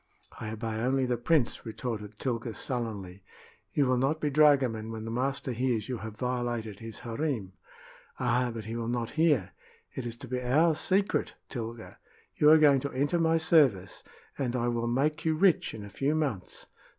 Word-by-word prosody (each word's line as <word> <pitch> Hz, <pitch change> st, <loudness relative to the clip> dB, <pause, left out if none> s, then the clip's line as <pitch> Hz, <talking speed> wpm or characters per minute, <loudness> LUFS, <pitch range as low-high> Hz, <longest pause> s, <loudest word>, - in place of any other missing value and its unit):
"I 110 Hz, -, -5 dB
obey 110 Hz, 0 st, -4 dB
only 130 Hz, +3 st, +1 dB
the 125 Hz, -1 st, 0 dB
prince," 125 Hz, +2 st, +1 dB
retorted 110 Hz, -2 st, -5 dB
Tilga, 120 Hz, -2 st, -3 dB
sullenly. 105 Hz, -7 st, -4 dB, 0.5 s
"You 145 Hz, -, +2 dB
will 130 Hz, -1 st, +2 dB
not 140 Hz, +5 st, +1 dB
be 150 Hz, -1 st, -1 dB
dragoman 135 Hz, -7 st, +3 dB
when 110 Hz, -1 st, -6 dB
the 115 Hz, -, -4 dB
master 130 Hz, +2 st, -1 dB
hears 120 Hz, -3 st, -1 dB
you 125 Hz, -3 st, -3 dB
have 110 Hz, 0 st, -8 dB
violated 120 Hz, -4 st, -2 dB
his 115 Hz, -1 st, -8 dB
harem." 115 Hz, -5 st, -3 dB, 0.7 s
"Ah, 125 Hz, 0 st, +1 dB
but 115 Hz, -1 st, -7 dB
he 110 Hz, +1 st, -5 dB
will 115 Hz, -1 st, -3 dB
not 120 Hz, -1 st, -2 dB
hear! 145 Hz, -, +2 dB, 0.4 s
It 125 Hz, -2 st, -4 dB
is 115 Hz, -, -5 dB
to 130 Hz, -, -9 dB
be 125 Hz, +1 st, -2 dB
our 150 Hz, +7 st, +3 dB
secret, 195 Hz, +6 st, 0 dB
Tilga. 115 Hz, -2 st, -6 dB, 0.4 s
You 150 Hz, -, +5 dB
are 160 Hz, -, +9 dB
going 145 Hz, -3 st, +5 dB
to 140 Hz, +2 st, -4 dB
enter 145 Hz, +6 st, +1 dB
my 165 Hz, 0 st, +3 dB
service, 135 Hz, -, +3 dB, 0.4 s
and 130 Hz, -3 st, -1 dB
I 120 Hz, -1 st, 0 dB
will 120 Hz, 0 st, -1 dB
make 150 Hz, +6 st, 0 dB
you 160 Hz, -1 st, +1 dB
rich 175 Hz, 0 st, +3 dB
in 105 Hz, -2 st, -8 dB
a -, -, -9 dB
few 145 Hz, +3 st, 0 dB
months. 140 Hz, -12 st, -3 dB
125 Hz, 185 wpm, -29 LUFS, 115-145 Hz, 0.7 s, are